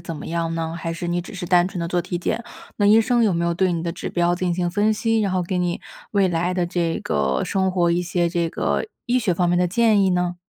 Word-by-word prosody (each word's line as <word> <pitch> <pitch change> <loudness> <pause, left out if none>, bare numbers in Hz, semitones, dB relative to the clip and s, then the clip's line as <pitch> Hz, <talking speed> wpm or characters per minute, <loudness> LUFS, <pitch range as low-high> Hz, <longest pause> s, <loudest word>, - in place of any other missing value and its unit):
怎 170 -1 -6
么 - - -8
样 165 0 -2
呢？ 165 0 -3
还 165 0 -4
是 170 +1 -5
你 175 0 0
只 195 +4 -10
是 180 -1 -5
单 175 0 +4
纯 185 - -7
地 170 - -2
做 175 0 0
体 175 -1 -4
检， 235 +6 -2 0.3
那 205 - +2
医 215 +2 +7
生 240 +1 +2
有 210 -4 +3
没 170 0 0
有 170 0 0
对 185 0 +1
你 165 -1 -2
的 170 -1 -2
指 180 - -5
标 175 0 +1
进 180 -1 -1
行 175 -1 0
分 210 +3 +2
析， 225 +1 +1
然 200 - 0
后 185 -1 0
给 180 +2 -3
你 175 -1 -1 0.3
未 200 -2 +3
来 175 +1 0
的 180 -1 0
这 170 -1 -1
个 65 -2 0
生 190 -1 0
活 175 -2 +2
一 175 +1 +1
些 175 -1 0
这 170 -1 -1
个 - - -1 0.2
医 250 +1 +2
学 210 -7 +1
方 175 0 +1
面 175 - +2
的 180 0 +2
建 215 0 +3
议 190 - +3
呢？ 180 0 0
175 Hz, 305 characters per minute, -22 LUFS, 170-190 Hz, 0.3 s, 医